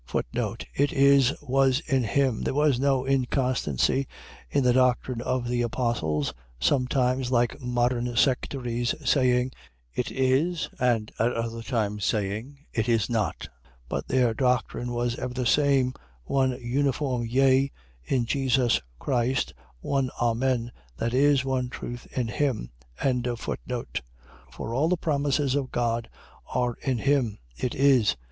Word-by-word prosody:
It 140 0 +1
is, 140 -1 +5
was 135 -1 +3
in 135 -6 0
him.. 130 +2 +1
.There - - -1
was 145 -4 +3
no 135 -1 +2
inconstancy 130 - +1 0.4
in 140 - +1
the 125 -1 +4
doctrine 125 -1 +2
of 125 0 -1
the 120 0 0
apostles, 115 - -1 0.3
sometimes, 125 - +1
like 120 +2 +1
modern 120 -1 0
sectaries, 120 -1 0
saying, 125 -2 +3 0.4
It - - -2
is, 135 +7 +1
and 120 -4 +1
at 115 +2 +2
other 115 0 -3
times 105 -4 -2
saying, 110 +9 -2
It 115 0 0
is 115 -2 +2
not. 110 -3 -1 0.4
But - - -3
their 125 -3 +2
doctrine 125 0 0
was 120 0 -1
ever 125 0 -4
the 125 -1 -1
same, 135 -1 +3 0.3
one 130 - +1
uniform 130 -1 0
yea, 135 +2 +3 0.3
in 125 - 0
Jesus 130 -1 +2 0.2
Christ, 125 - 0 0.3
one 135 - 0
Amen, 120 0 +1 0.3
that 115 - -1
is, 140 0 +4
one 130 -2 -1
truth 120 -1 -7
in 125 -2 +1
him. 115 - -1 0.3
1:20. 125 -1 -2 0.5
For 115 - -6
all 145 +6 +2
the 180 - +2
promises 145 -3 0
of 140 -2 -1
God 115 -1 -1 0.4
are 125 -1 0
in 130 -3 0
him, 130 -5 +1 0.2
It 125 - -3
is. 130 - +4
125 Hz, 135 wpm, -26 LUFS, 120-135 Hz, 0.5 s, is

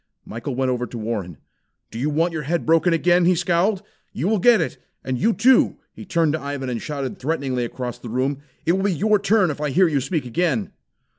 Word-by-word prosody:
Michael 120 +4 -5
went 130 0 0
over 125 -1 -2
to 120 - -8
Warren. 105 -8 -4 0.5
"Do 115 - -6
you 145 +5 0
want 165 +3 +1
your 155 - -3
head 165 +4 -2
broken 165 +2 +3
again?" 175 +1 +3
he 180 +1 +4
scowled. 185 +4 +1 0.3
"You 150 - -2
will 215 0 +2
get 235 +2 +5
it. 165 - -3 0.2
And 130 -2 -2
you, 225 - +3
too!" 255 +3 +4 0.2
He - - -10
turned 165 -5 +1
to 160 - -2
Ivan, 140 -2 -4
and 120 -2 -3
shouted 140 -3 -5
threateningly 130 -4 -1
across 125 0 -6
the 120 - -8
room. 130 +4 -1 0.3
"It 165 - +3
will 190 +2 +1
be 200 - +2
your 210 +5 +2
turn 200 -4 +2
if 145 - -7
I 150 - 0
hear 180 +7 +4
you 145 -4 0
speak 145 +1 -2
again." 125 - -1
150 Hz, 225 wpm, -22 LUFS, 130-180 Hz, 0.5 s, get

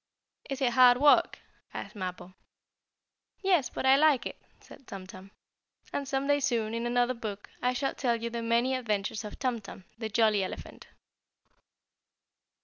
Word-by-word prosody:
"Is 275 0 -4
it 250 -2 +2
hard 250 -1 +7
work?" 290 +1 +5 0.4
asked - - -7
Mappo. 185 -1 -6 1.1
"Yes, 360 -9 +3
but - - -4
I 265 +1 +6
like 290 -5 +4
it," - - -7 0.2
said 270 - -16
Tum 195 -1 -8
Tum. 185 +1 -12 0.6
And 280 - -2
some 270 0 -1
day 285 0 +3
soon, 230 -5 0
in 230 +1 -2
another 245 +1 +2
book, 215 -4 -7
I 250 +1 +1
shall 270 +2 -1
tell 240 -3 0
you 235 +1 -4
the 235 0 -3
many 235 +3 +1
adventures 215 -4 -2
of 210 - -8
Tum 250 -4 -1
Tum, 195 -1 -11
the 220 -2 -3
jolly 215 -2 +3
elephant. 185 - -8
240 Hz, 160 wpm, -29 LUFS, 215-265 Hz, 1.1 s, hard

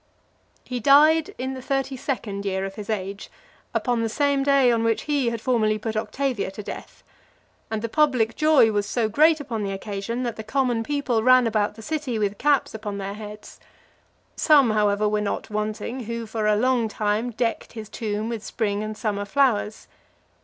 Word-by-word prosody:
LVII. - - -28
He 250 -1 -2
died 300 +5 +5
in 260 +1 -3
the 260 - -7
thirty 270 0 -2
second 215 -6 -4
year 190 -1 -1
of 195 - -6
his 210 0 -8
age, 200 -1 -4 0.4
upon 245 -2 0
the 225 - 0
same 280 +3 +1
day 275 -2 +4
on 230 -1 +1
which 230 -1 +1
he 285 -5 +1
had 230 -1 -4
formerly 220 -3 +1
put 220 +1 -4
Octavia 230 +1 -2
to 200 +2 -8
death; - - -9 0.7
and 220 0 -3
the - - 0
public 250 -4 +2
joy 305 -7 +5
was 205 -1 -1
so 235 -3 0
great 310 +8 +4
upon 240 -6 -4
the 200 -1 -2
occasion, 205 +5 -4
that 235 -2 -3
the 220 - -6
common 245 0 0
people 275 -4 0
ran 255 +1 +6
about 215 -2 0
the 220 - -11
city 295 -4 -2
with 205 -1 -1
caps 290 -2 +2
upon 210 -2 -5
their 195 0 -4
heads. 210 0 -10 0.8
Some, 280 -7 +5
however, 210 -1 +2
were 210 0 0
not 215 +2 -3
wanting, 215 +4 -3
who 230 +1 -4
for 220 -1 -2
a 210 - +4
long 245 +1 +2
time 215 +2 -1
decked 230 0 -2
his 220 -2 -7
tomb 215 0 -3
with 230 -2 -4
spring 205 -3 -2
and 215 0 -5
summer 205 -3 -2
flowers. 225 -3 +1
225 Hz, 190 wpm, -24 LUFS, 210-260 Hz, 0.8 s, ran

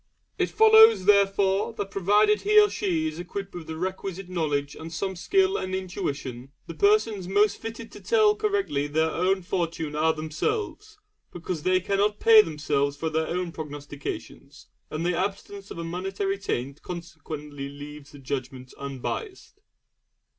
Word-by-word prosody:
It - - +1
follows, 440 - +7
therefore, 200 +1 +3
that 205 -3 -5
provided 210 +2 +3
he 425 +1 +5
or 415 -1 +5
she 165 -6 -1
is 155 +1 -6
equipped 195 +2 -6
with 170 -3 -8
the 160 - -5
requisite 190 +1 -4
knowledge 145 -5 -1
and 160 +1 -8
some 190 +3 -3
skill 385 - +2
and 185 0 -3
intuition, 140 -8 -5
the 165 - -7
persons 225 - +2
most 205 +2 +3
fitted 225 0 -7
to - - -12
tell 435 -2 +4
correctly 400 - 0
their 160 +2 +1
own 185 +3 +1
fortune 165 -4 -2
are 160 +1 +3
themselves; 405 - -3 0.3
because 175 -2 -5
they 185 +3 +3
cannot 200 +3 0
pay 225 -1 +8
themselves 145 -4 -1
for 160 +1 -2
their 160 0 0
own 180 0 -2
prognostications, 145 -1 -8 0.2
and 155 +2 -3
the 175 0 +1
absence 195 +1 -4
of - - -8
a 170 - -4
monetary 195 +3 -3
taint 140 -7 -3
consequently 155 -5 -7
leaves 145 0 -10
the 145 - -12
judgment 130 -1 -6
unbiased. 140 - -6
180 Hz, 155 wpm, -26 LUFS, 150-205 Hz, 0.3 s, pay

